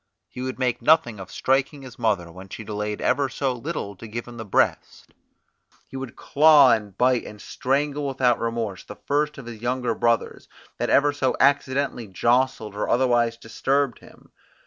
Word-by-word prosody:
He 125 - -8
would 130 0 -4
make 125 -2 -1
nothing 120 -6 +3
of 95 - -9
striking 135 +2 0
his 130 -2 -12
mother 100 -7 0
when 95 +3 -12
she 110 - -8
delayed 105 0 -4
ever 135 +1 +1
so 130 0 -1
little 125 -5 -5
to 115 - -10
give 115 +3 -6
him 120 -1 -10
the 110 - -5
breast; 100 - -1 0.8
he - - -11
would 130 -3 -6
claw, 145 -3 +6
and 105 -4 -1
bite, 125 -1 +2
and 105 - -10
strangle 140 +5 -1
without 130 -3 +1
remorse 115 -4 -3
the 105 - -10
first 150 +5 -1
of 135 - -9
his 115 -2 -9
younger 125 -1 -1
brothers, 115 +1 -1 0.3
that - - -1
ever 145 +1 +4
so 130 -2 0
accidentally 140 -3 +1
jostled 115 +1 0
or 105 - -2
otherwise 120 -2 +2
disturbed 130 +3 -1
him. - - -19
125 Hz, 175 wpm, -24 LUFS, 110-135 Hz, 0.8 s, claw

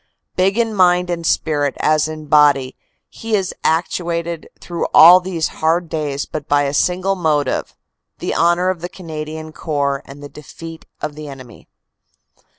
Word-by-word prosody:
Big 190 +3 +2
in 230 -2 +1
mind 180 -2 +3
and 170 -1 -2
spirit 145 -3 0
as 155 0 +2
in 155 -1 -7
body, 145 -3 +3 0.3
he 225 -1 -3
is 190 -3 -1
actuated 170 0 -1
through 170 -1 -3
all 175 +3 +10
these 180 -3 -2
hard 165 +1 +1
days 145 -3 -3
by 155 - -4
but 145 0 +1
a 140 - -2
single 185 +5 +1
motive 155 -7 -1 0.4
the - - -3
honor 175 +2 +2
of 180 -3 -7
the 175 - -5
Canadian 155 -3 -7
Corps 140 -4 -2
and 140 +1 -12
the - - -7
defeat 160 +3 -11
of 150 - -3
the 155 0 -9
enemy. 130 -5 -12
160 Hz, 155 wpm, -18 LUFS, 145-175 Hz, 0.4 s, all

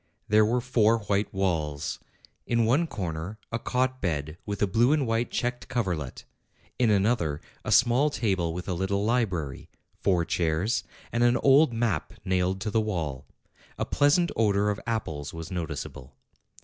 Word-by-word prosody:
There 105 +1 +5
were 120 +3 +1
four 115 -2 +3
white 100 0 0
walls: 80 -6 -1 0.5
in 115 -1 +2
one 140 +9 +3
corner 90 - -4
a 115 - -1
cot 130 +2 -1
bed 75 -4 -2
with 100 -1 -3
a - - +6
blue 115 +8 +3
and 150 -3 +1
white 115 +1 0
checked 125 0 -2
coverlet; 90 - -2 0.6
in 120 -3 +4
another, 100 -7 +2 0.2
a - - -3
small 130 +4 +5
table 95 - 0
with 90 +2 -6
a 95 - -1
little 95 +3 -1
library; 95 - -1 0.3
four 90 -3 +2
chairs, 85 +7 0 0.3
and 120 +1 +1
an 120 0 +4
old 140 +1 +5
map 115 -1 -1
nailed 95 0 +1
to 105 - -2
the 110 - +2
wall. 80 -10 -3 0.5
A - - -1
pleasant 150 +5 +3
odor 105 -2 +2
of 100 - -4
apples 80 -11 -3
was 80 -1 -7
noticeable. 75 -6 -5
105 Hz, 160 wpm, -27 LUFS, 85-120 Hz, 0.6 s, a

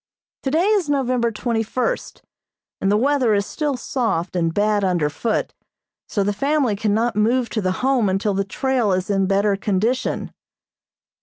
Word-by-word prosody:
Today 315 +6 +1
is 405 -7 +2
November 255 -4 +1
twenty 230 +1 -1
first, 255 - -3 0.6
and 195 - +1
the 210 - +4
weather 255 -3 +2
is 200 0 0
still 295 0 -2
soft 225 -9 -2
and 165 -2 +1
bad 205 +2 +1
under 175 -6 +1
foot, 225 +7 -2 0.6
so 200 - 0
the 205 +1 0
family 275 0 +1
cannot 220 +3 0
move 235 +3 +2
to 215 - -1
the 185 -1 0
Home 255 -6 +3
until 195 +2 0
the 195 +1 0
trail 240 +1 0
is 185 +2 -1
in 195 -1 +1
better 200 +1 +2
condition. 210 +5 -1
220 Hz, 160 wpm, -21 LUFS, 195-255 Hz, 0.6 s, the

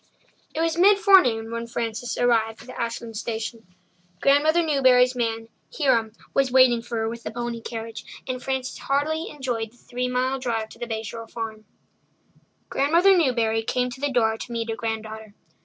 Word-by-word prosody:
It 320 - 0
was 330 +1 0
mid 395 +2 +7
forenoon 265 - +4
when 230 0 -4
Frances 230 0 -3
arrived 225 -2 +1
at 255 - -9
Ashland 230 -1 -4
station. 225 0 -5 0.5
Grandmother 305 +5 +4
Newbury's 260 -4 +4
man, 225 -2 -2 0.3
Hiram, 230 -6 +2 0.2
was 270 -2 +2
waiting 255 -2 +5
for 235 0 -5
her 225 0 0
with 235 +1 -5
the - - -5
pony 240 0 -4
carriage, 225 -1 -6 0.2
and 255 -1 -3
Frances 265 0 -3
heartily 310 +4 -1
enjoyed 245 -6 -3
the 245 - -24
three 250 +1 -4
mile 255 +2 0
drive 225 -4 -2
to - - -15
the 240 - -4
Bay 220 -1 -3
Shore 230 +1 -7
Farm. 220 -2 -6 1.0
Grandmother 340 +8 +4
Newbury 235 -9 +2
came 250 +2 -1
to 255 +2 -10
the 285 - +1
door 225 -3 +2
to 245 - -7
meet 230 -1 -2
her - - -2
granddaughter. 220 -2 -5
240 Hz, 175 wpm, -24 LUFS, 225-265 Hz, 1.0 s, mid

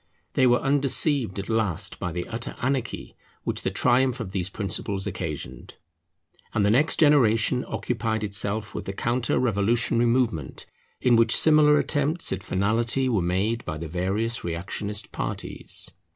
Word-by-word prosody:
They 130 -3 +4
were 120 0 +4
undeceived 140 - +1
at 100 - -4
last 110 -7 -2
by 90 - -3
the 85 +1 -4
utter 115 +1 -6
anarchy 130 -1 -3 0.3
which - - -2
the - - -1
triumph 130 0 +2
of 105 -6 -5
these 95 -2 -2
principles 100 0 -1
occasioned; 75 -9 -6 0.8
and 105 - +2
the 100 - +3
next 145 +8 +2
generation 125 -5 +3
occupied 110 -3 -2
itself 105 +1 -2
with - - -5
the 95 - -4
counter 120 +4 -1
revolutionary 115 +1 +2
movement, 115 - -1 0.4
in 120 -2 +4
which 115 0 +4
similar 150 -1 +5
attempts 150 +4 +1
at - - -4
finality 115 +7 0
were 110 -6 +1
made 100 +7 -1
by 80 - -5
the 80 +1 -6
various 100 +8 -2
reactionist 100 +5 -3
parties. - - -4
110 Hz, 150 wpm, -25 LUFS, 95-125 Hz, 0.8 s, similar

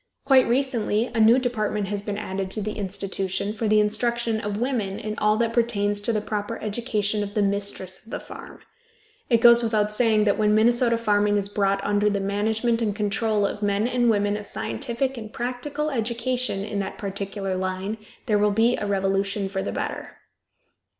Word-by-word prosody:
Quite 265 -2 +5
recently 235 -3 0
a 230 - -1
new 225 +3 +6
department 215 -5 -1
has 205 -1 -2
been 205 0 -4
added 195 -2 -4
to 215 - -3
the 215 - -2
institution, 195 0 -3
for 220 0 -2
the 215 0 +4
instruction 225 +1 0
of 205 0 -3
women 225 -5 -1
in 215 0 -4
all 210 0 +3
that 230 0 0
pertains 205 -4 +1
to 220 - 0
the 215 -2 0
proper 205 -1 -3
education 210 -1 -1
of 205 0 -5
the 210 - +2
mistress 200 -2 -2
of 225 - -18
the - - -4
farm. - - -11 0.7
It 230 -3 +3
goes 235 0 +8
without 215 -2 +1
saying 220 -1 +4
that 205 0 +1
when 210 0 +3
Minnesota 235 +1 +3
farming 205 -2 +2
is 200 -1 0
brought 195 -1 0
under 205 0 +2
the 200 -1 -1
management 220 +4 0
and 210 -3 0
control 210 0 0
of 205 - -3
men 205 +2 +1
and 245 -1 +2
women 205 -1 +2
of 210 -1 -6
scientific 260 +3 -2
and 215 -1 -9
practical 255 +6 -3
education 240 -2 -1
in 205 0 -3
that 195 0 -4
particular 195 -1 -4
line 185 +3 -3 0.3
there 210 -5 +2
will 210 0 +3
be 225 +4 +3
a 205 - -3
revolution 195 0 0
for 190 0 -2
the - - -3
better. - - -5
210 Hz, 190 wpm, -24 LUFS, 200-230 Hz, 0.7 s, goes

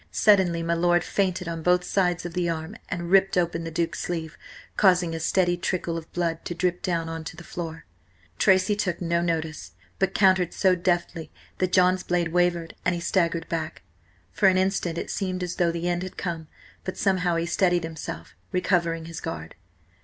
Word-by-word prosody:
Suddenly 185 -5 +3
my 170 0 +1
lord 175 0 +3
feinted 185 -2 -1
on 165 -1 -4
both 180 +2 +3
sides 180 -2 0
of 175 - -5
the 175 -1 0
arm 165 +4 -4
and 175 -2 -4
ripped 195 -1 +4
open 170 -1 0
the - - -3
Duke's 165 0 -2
sleeve, 165 -3 -4 0.4
causing 180 -4 +4
a 165 - -3
steady 175 +2 +2
trickle 175 -1 -2
of 165 -1 -7
blood 165 -2 -2
to 175 - -4
drip 180 +1 0
down 170 -2 -1
on 165 0 -5
to 165 - -6
the 175 - -9
floor. 165 -2 -6 0.5
Tracy 190 +1 +4
took 185 -4 -1
no 170 -1 0
notice, 160 - -3 0.3
but 195 - +1
countered 185 -3 +3
so 190 -2 +4
deftly 175 -2 -1 0.3
that 185 -1 +1
John's 185 0 +4
blade 175 -2 0
wavered, 175 -1 +1
and 180 - +1
he 170 - -4
staggered 170 -2 0
back. 160 -2 -4 0.5
For 95 - +3
an 185 -1 +5
instant 185 -3 0
it - - -4
seemed 185 -2 -2
as 180 0 -4
though 170 -1 +3
the 170 +1 -3
end 175 0 0
had 185 0 -7
come, 165 -4 -4 0.4
but 185 - -5
somehow 180 -3 +1
he 165 0 0
steadied 175 0 +2
himself, 160 - -7 0.2
recovering 170 -3 +1
his 165 0 -7
guard. 80 0 -6
175 Hz, 190 wpm, -25 LUFS, 165-185 Hz, 0.5 s, an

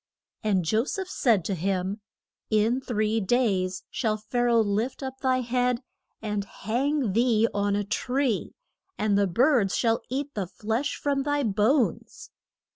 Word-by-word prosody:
And 195 -5 +1
Jo 220 +7 +2
seph 380 +4 -4
said 225 - +2
to 195 - -1
him, 190 +3 -2 0.5
In 225 +4 +2
three 220 -3 0
days 190 -4 +1
shall 215 -3 0
Pha 215 +3 -4
ra 240 -1 +3
oh - - +5
lift 220 +6 -1
up 265 0 -6
thy 255 -1 +1
head 245 0 0 0.4
and 210 -2 -1
hang 245 +4 -1
thee 230 0 +3
on 200 0 +1
a 205 - 0
tree; 250 +3 -1 0.4
and 210 -1 +1
the 200 0 +3
birds 230 - +3
shall 230 -1 +1
eat 280 +3 -3
the 195 -4 -3
flesh 225 - -2
from 280 -1 0
thy 290 0 0
bones. 230 - 0
225 Hz, 155 wpm, -26 LUFS, 205-255 Hz, 0.5 s, oh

